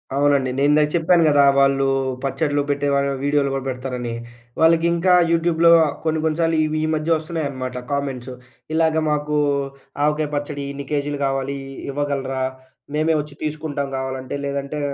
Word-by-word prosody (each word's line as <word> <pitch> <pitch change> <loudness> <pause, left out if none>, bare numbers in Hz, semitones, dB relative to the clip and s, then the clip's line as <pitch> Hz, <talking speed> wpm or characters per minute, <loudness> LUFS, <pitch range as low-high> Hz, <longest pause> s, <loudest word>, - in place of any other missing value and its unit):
అవునండి. 140 -2 +2
నేనిందాక 150 +2 +4
చెప్పాను 170 0 +3
గదా! 145 -2 +5
వాళ్ళు 135 0 +3 0.4
పచ్చడ్లు 145 +1 0
పెట్టే 145 0 0
వాళ్ళు 140 0 +1
వీడియోలు 145 -1 +2
కూడా 135 -1 -3
పెడతారని. 125 -2 -4 0.5
వాళ్ళకి 165 +1 +4
ఇంకా 175 +2 +2 0.2
యూట్యూబ్‌లో 170 0 +4 0.3
కొన్ని 160 -1 0
కొన్ని 160 0 0
సార్లు 165 -1 +2
ఇవి 155 0 -1
ఈ - - -1
మధ్య 155 +2 -3
వస్తున్నాయనమాట. 140 -6 -4 0.2
కామెంట్స్ 135 -3 -3 0.4
ఇలాగ 160 -1 +2
మాకు 150 0 -1 0.7
ఆవకాయ 150 0 +1
పచ్చడి 145 0 -3
ఇన్ని 140 0 -7
కేజీలు 145 -1 -1
కావాలి. 135 0 -2 0.3
ఇవ్వగలరా? 135 -2 -2 0.5
మేమే 155 +1 +2
వచ్చి 145 -1 -11
తీసుకుంటాం 150 -2 -3
కావాలంటే. 130 0 -4
లేదంటే 140 +1 -3
145 Hz, 140 wpm, -21 LUFS, 140-155 Hz, 0.7 s, గదా